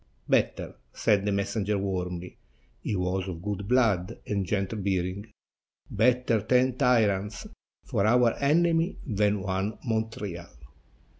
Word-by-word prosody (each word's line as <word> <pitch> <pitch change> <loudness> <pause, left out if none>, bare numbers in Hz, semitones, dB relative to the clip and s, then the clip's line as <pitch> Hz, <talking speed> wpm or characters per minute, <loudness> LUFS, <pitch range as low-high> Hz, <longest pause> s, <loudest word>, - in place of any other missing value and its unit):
"Better," - - +1 0.2
said 105 -2 +2
the - - +2
messenger 100 +1 -1
warmly 90 -2 -3 0.4
(he 105 - -3
was 90 +1 -1
of 85 -2 -6
good 100 -1 -4
blood 115 -5 +2
and 100 -3 -2
gentle 100 +2 -1
bearing), 95 +1 -2 0.6
"better 120 0 +2
ten 125 +3 +2
tyrants 105 -6 +1 0.4
for 100 - 0
our 120 0 +4
enemy 165 +4 +2
than 105 -4 +1
one 95 +2 -2
Montreal." 110 - -4
105 Hz, 120 wpm, -27 LUFS, 95-115 Hz, 0.6 s, our